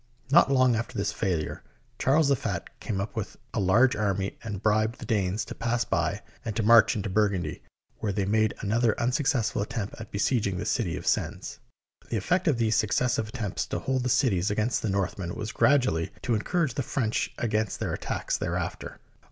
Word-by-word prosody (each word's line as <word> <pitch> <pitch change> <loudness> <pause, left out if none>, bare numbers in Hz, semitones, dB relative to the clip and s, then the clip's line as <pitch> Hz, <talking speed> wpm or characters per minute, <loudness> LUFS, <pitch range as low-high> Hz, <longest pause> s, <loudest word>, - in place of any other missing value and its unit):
Not 150 -2 +6
long 130 -3 +4
after 115 +1 -3
this 100 0 0
failure, 85 -6 -2 0.4
Charles 140 +2 +3
the 140 - +5
Fat - - -3
came 100 -3 -3
up 100 +4 -4
with 110 -2 -4 0.2
a - - -1
large 110 +7 +4
army 100 -2 -1
and 105 -4 -4
bribed 110 +2 +1
the - - -8
Danes 100 -2 0
to - - -7
pass 120 +1 -1
by - - -1 0.2
and 110 -3 -4
to 110 - 0
march 115 0 +6
into 100 -2 -2
Burgundy, 100 -2 0 0.4
where 105 - -1
they 100 0 -1
made 110 +2 +2
another 110 +2 +1
unsuccessful 125 -3 +1
attempt 105 0 -3
at 115 - -9
besieging 100 -2 0
the 100 - -3
city 110 -7 0
of - - -8
Sens. - - -1 0.5
The 115 - -1
effect 175 - 0
of 145 -6 +3
these 115 -2 +2
successive 110 +2 +1
attempts 110 -3 -3
to - - -2
hold 130 -1 -1
cit 125 -2 +3
ies 90 +1 0
against 105 +4 0
the 110 - -1
Northmen 95 -2 -2
was 110 0 -4
gradually 125 - +2
to 120 - +1
encour 170 - 0
age 130 - -4
the 140 - -1
French 120 -3 -1
against 110 -2 -1
their - - -2
attacks - - -2
thereafter. - - -3
110 Hz, 195 wpm, -27 LUFS, 100-120 Hz, 0.5 s, Not